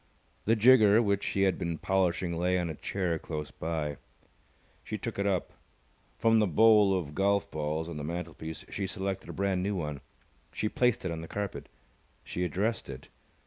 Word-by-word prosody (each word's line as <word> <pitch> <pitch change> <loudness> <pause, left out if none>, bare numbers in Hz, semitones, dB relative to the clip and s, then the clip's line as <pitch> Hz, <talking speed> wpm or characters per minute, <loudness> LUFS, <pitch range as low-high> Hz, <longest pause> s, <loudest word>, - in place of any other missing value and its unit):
The 115 - +4
jigger 110 -2 +6
which 100 -3 +1
he 100 - +1
had 95 -2 +2
been 85 -1 -2
polishing 90 -1 0
lay 90 +2 +1
on 85 -2 -1
a - - -4
chair 85 +1 -2
close 75 -2 -5
by. 75 -3 -3 0.9
She - - -4
took - - -5
it 100 - +1
up. 95 -3 -1 0.6
From 115 0 +4
the 105 - +3
bowl 105 +1 +5
of 75 -5 -5
golf 100 +3 +1
balls 80 +1 -2
on 85 -2 -6
the 75 - -5
mantelpiece 80 0 -5
she 100 -2 -3
selected 95 0 -4
a - - -5
brand 95 -1 0
new 100 +2 -1
one. 75 -5 -4 0.5
She 105 - -1
placed 125 -4 +1
it 90 - -1
on 80 -1 -4
the 80 - -8
carpet. 100 +1 -5 0.5
She 90 - -3
addressed 100 +4 -1
it. 65 -1 -9
90 Hz, 185 wpm, -30 LUFS, 80-100 Hz, 0.9 s, jigger